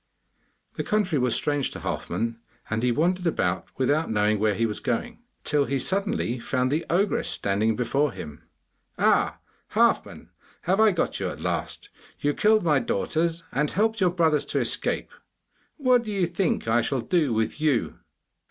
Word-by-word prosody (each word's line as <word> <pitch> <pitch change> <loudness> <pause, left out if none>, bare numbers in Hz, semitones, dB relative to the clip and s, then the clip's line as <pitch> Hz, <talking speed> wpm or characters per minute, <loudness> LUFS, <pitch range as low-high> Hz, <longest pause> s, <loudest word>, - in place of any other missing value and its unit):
The - - -1
country 195 -8 +1
was 125 -2 +3
strange 145 -2 +1
to - - -8
Halfman, 115 0 -3 0.3
and 110 +1 0
he 125 0 +2
wandered 175 +7 +1
about 90 - 0
without 145 +5 +1
knowing 105 -1 +1
where 105 -1 +2
he 115 - +1
was 105 -2 -3
going, 225 - -3 0.2
till 145 -2 +2
he 140 - -1
suddenly 195 - -1
found 125 +2 -1
the 155 +3 0
ogress 195 +5 +1
standing 105 +3 0
before 135 +5 0
him. 75 -3 -9 0.6
'Ah, - - +2 0.4
Halfman, - - +1 0.3
have 190 +4 +1
I 220 0 +6
got 180 - -1
you - - -1
at - - -8
last? - - -3 0.3
You 145 0 +1
killed 215 +3 +3
my 150 -5 +3
daughters 165 - -1
and 150 -1 0
helped 220 +1 0
your 180 - +5
brothers 160 -4 +2
to - - -1
escape. - - -1 0.7
What 255 -4 +4
do 215 - -4
you 195 -3 +1
think 175 - -1
I 115 +2 +3
shall 130 +2 -1
do 150 +2 +1
with 110 +6 -1
you? 145 -7 0
145 Hz, 170 wpm, -25 LUFS, 115-180 Hz, 0.7 s, I